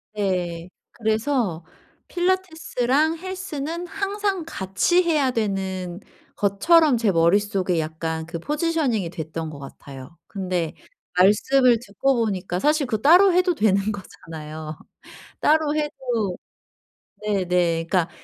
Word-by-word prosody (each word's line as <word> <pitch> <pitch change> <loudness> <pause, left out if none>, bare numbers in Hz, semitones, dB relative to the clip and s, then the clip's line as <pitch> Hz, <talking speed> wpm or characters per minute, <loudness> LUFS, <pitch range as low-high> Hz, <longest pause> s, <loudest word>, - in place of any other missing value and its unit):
네. 180 -4 -2 0.2
그래서 220 - -1 0.4
필라테스랑 320 -5 0
헬스는 350 -2 -5
항상 395 -1 -2
같이 325 - +1
해야 300 -6 +2
되는 190 -5 -2 0.4
것처럼 270 - +4
제 225 -3 +2
머릿속에 185 +1 +2
약간 160 +1 -3
그 170 0 -6
포지셔닝이 295 - 0
됐던 160 -1 -5
것 145 -2 -9
같아요. 135 +2 -11
근데 180 -4 -2 0.4
말씀을 235 +6 +4
듣고 260 +7 0
보니까 185 -3 -2
사실 295 - +2
그 220 -3 -2
따로 360 - +6
해도 360 0 +3
되는 210 - +2
거잖아요. 155 -5 -8 0.6
따로 305 -1 +3
해도 250 -10 -2 0.9
네네 180 -5 +1
그러니까 180 -4 +1
210 Hz, 245 characters per minute, -23 LUFS, -, 0.9 s, 따로